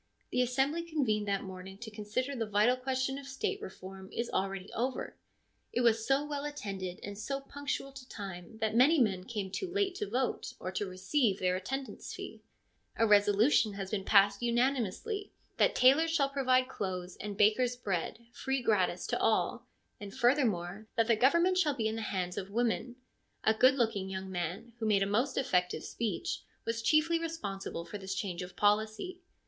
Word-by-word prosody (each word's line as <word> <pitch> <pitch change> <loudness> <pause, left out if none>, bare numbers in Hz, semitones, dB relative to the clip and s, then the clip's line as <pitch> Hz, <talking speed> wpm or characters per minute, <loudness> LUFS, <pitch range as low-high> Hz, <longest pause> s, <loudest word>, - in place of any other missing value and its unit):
The 250 - +2
assembly 270 +6 +1
convened 260 -11 0
that 200 -1 0
morning 190 0 -8
to 220 +1 -8
consider 215 +6 -3
the 225 -3 -2
vital 210 +4 +4
question 260 +1 -1
of 275 - -10
State 270 -1 -2
reform 190 0 -9
is 235 0 -3
already 195 0 -2
over; 250 +3 -2 0.6
it 245 - 0
was 225 -2 +3
so 275 +2 +3
well 290 -1 -3
attended 195 -11 -5
and 200 0 -6
so 250 +7 -3
punctual 275 0 -4
to 270 -2 -12
time 195 +1 -8
that 220 -1 0
many 275 +7 +6
men 190 -7 +1
came 205 -5 -4
too 370 - -3
late 400 -1 +1
to 415 0 -3
vote 255 0 -1
or 185 - -4
to 200 +1 -2
receive 190 +4 +1
their 180 -1 +1
attendance 265 +8 -5
fee. - - -8 0.5
A 225 - +3
resolution 210 +2 +4
has 195 -1 -5
been 205 -3 -1
passed 200 +1 +5
unanimously 255 - 0 0.2
that - - +3
tailors 275 +6 +5
shall 290 -4 +2
provide 255 -2 +2
clothes 185 -6 -4
and 205 -1 -6
bakers 225 +4 +4
bread, 215 0 -3
free 265 0 -2
gratis 210 -6 +2
to - - -1
all; - - +1 0.3
and, 200 -1 -8
further 260 +2 +4
more, 195 +1 -3
that 230 -2 +3
the 230 0 +4
government 340 - +4
shall 300 -6 +2
be 225 -4 0
in 220 - -2
the 225 - -3
hands 185 -4 -2
of 190 - -7
women. 235 +2 0 0.5
A 220 - +4
good 255 +4 +5
looking 220 -6 0
young 190 0 -5
man, 180 +6 -4
who 220 - -1
made 200 -2 +4
a - - +1
most 240 +7 0
effective 180 -9 +1
speech, 220 -7 -3 0.2
was 230 0 -1
chiefly 310 +7 +3
responsible 200 - -4
for 205 - -7
this 190 0 -4
change 190 -2 -3
of 180 0 -8
policy. 215 - +1
225 Hz, 185 wpm, -32 LUFS, 195-265 Hz, 0.6 s, many